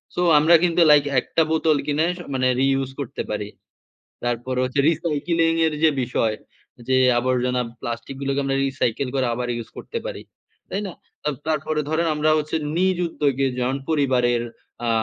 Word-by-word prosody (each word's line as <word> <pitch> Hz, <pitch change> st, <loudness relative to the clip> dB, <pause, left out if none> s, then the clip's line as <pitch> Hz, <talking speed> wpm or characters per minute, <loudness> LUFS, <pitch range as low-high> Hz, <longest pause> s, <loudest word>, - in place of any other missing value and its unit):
So 180 Hz, -, 0 dB, 0.2 s
আমরা 165 Hz, +3 st, +6 dB
কিন্তু 170 Hz, 0 st, +3 dB
like 145 Hz, -1 st, +6 dB, 0.2 s
একটা 165 Hz, -, 0 dB
বোতল 160 Hz, -2 st, +2 dB
কিনে 150 Hz, +2 st, +1 dB
স -, -, -11 dB
মানে 130 Hz, -1 st, +1 dB
রিইউজ 135 Hz, -1 st, +1 dB
করতে 135 Hz, -, -4 dB
পারি। 105 Hz, -1 st, -3 dB, 0.8 s
তারপরে 120 Hz, +1 st, -2 dB
হচ্ছে 130 Hz, +2 st, -1 dB
recycling 165 Hz, +1 st, 0 dB
এর 160 Hz, -, 0 dB
যে 160 Hz, -, +7 dB
বিষয় 115 Hz, -3 st, 0 dB, 0.5 s
যে 130 Hz, -, +3 dB, 0.2 s
আবর্জনা, 125 Hz, 0 st, 0 dB, 0.2 s
প্লাস্টিক 120 Hz, +3 st, -5 dB
গুলোকে 140 Hz, 0 st, -1 dB
আমরা 135 Hz, 0 st, 0 dB
recycle 130 Hz, -1 st, -1 dB
করে 130 Hz, -1 st, +1 dB
আবার 125 Hz, +1 st, -3 dB
ইউস 115 Hz, -1 st, -6 dB
করতে 465 Hz, -, -6 dB
পারি। -, -, -5 dB, 0.5 s
তাই 200 Hz, -, -2 dB
না? 180 Hz, -, -7 dB, 0.3 s
তাব 150 Hz, -2 st, -1 dB
তারপরে 155 Hz, 0 st, -1 dB
ধরেন 165 Hz, +2 st, +1 dB
আমরা 150 Hz, +1 st, +1 dB
হচ্ছে 155 Hz, +1 st, -2 dB, 0.2 s
নিজ 185 Hz, 0 st, +2 dB
উদ্যোগে 140 Hz, -4 st, 0 dB
যেমন 125 Hz, +2 st, 0 dB
পরিবারের 125 Hz, -6 st, +2 dB, 0.4 s
আ -, -, +1 dB
140 Hz, 165 wpm, -22 LUFS, 125-160 Hz, 0.8 s, যে